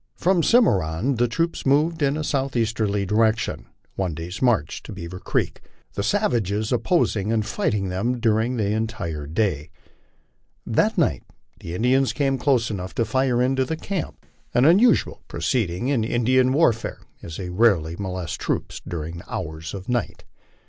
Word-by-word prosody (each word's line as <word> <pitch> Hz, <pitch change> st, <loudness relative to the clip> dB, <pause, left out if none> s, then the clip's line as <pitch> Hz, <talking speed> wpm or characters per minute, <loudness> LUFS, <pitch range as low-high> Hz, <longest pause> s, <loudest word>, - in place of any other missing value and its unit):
From 185 Hz, +1 st, +2 dB
the -, -, 0 dB
Cimarron 110 Hz, -, +3 dB
the 120 Hz, +1 st, +3 dB
troops 165 Hz, +8 st, -1 dB
moved 155 Hz, +4 st, +2 dB
in 140 Hz, +1 st, +2 dB
a 155 Hz, -, -2 dB
southeasterly 115 Hz, -8 st, 0 dB
direction, 110 Hz, +3 st, +1 dB, 0.3 s
one 90 Hz, -5 st, -2 dB
day's 85 Hz, +3 st, -6 dB
march 115 Hz, -, +1 dB
to -, -, -10 dB
Bearer 90 Hz, -1 st, -7 dB
creek, -, -, -2 dB, 0.3 s
the -, -, -2 dB
savages 110 Hz, -, 0 dB
opposing 115 Hz, -, +1 dB
and 110 Hz, -2 st, +1 dB
fighting 100 Hz, -3 st, -1 dB
them 115 Hz, +7 st, -1 dB
during 115 Hz, +2 st, +1 dB
the 105 Hz, -2 st, 0 dB
entire 105 Hz, -9 st, -3 dB
day. 80 Hz, -3 st, -1 dB, 1.0 s
That -, -, +1 dB
night -, -, +2 dB, 0.4 s
the 85 Hz, -, -6 dB
Indians 130 Hz, +6 st, +2 dB
came 135 Hz, -2 st, 0 dB
close 125 Hz, -5 st, +2 dB
enough 95 Hz, -2 st, -5 dB
to 115 Hz, -, +1 dB
fire 125 Hz, +1 st, +1 dB
into 130 Hz, +1 st, +2 dB
the 160 Hz, +5 st, -3 dB
camp, 190 Hz, -1 st, -5 dB, 0.3 s
an 125 Hz, -, +5 dB
unusual 205 Hz, +9 st, +4 dB
proceeding 90 Hz, +5 st, -1 dB
in 130 Hz, -6 st, +1 dB
Indian 125 Hz, +3 st, +2 dB
warfare, 130 Hz, -6 st, +1 dB, 0.2 s
as 80 Hz, -, -7 dB
they 90 Hz, -2 st, -5 dB
rarely 90 Hz, -6 st, +2 dB
molest 90 Hz, -4 st, -4 dB
troops -, -, -3 dB
during 85 Hz, 0 st, -5 dB
the -, -, -14 dB
hours 80 Hz, +3 st, -5 dB
of 95 Hz, -1 st, -8 dB
night. 120 Hz, -3 st, -2 dB
110 Hz, 155 wpm, -23 LUFS, 95-130 Hz, 1.0 s, an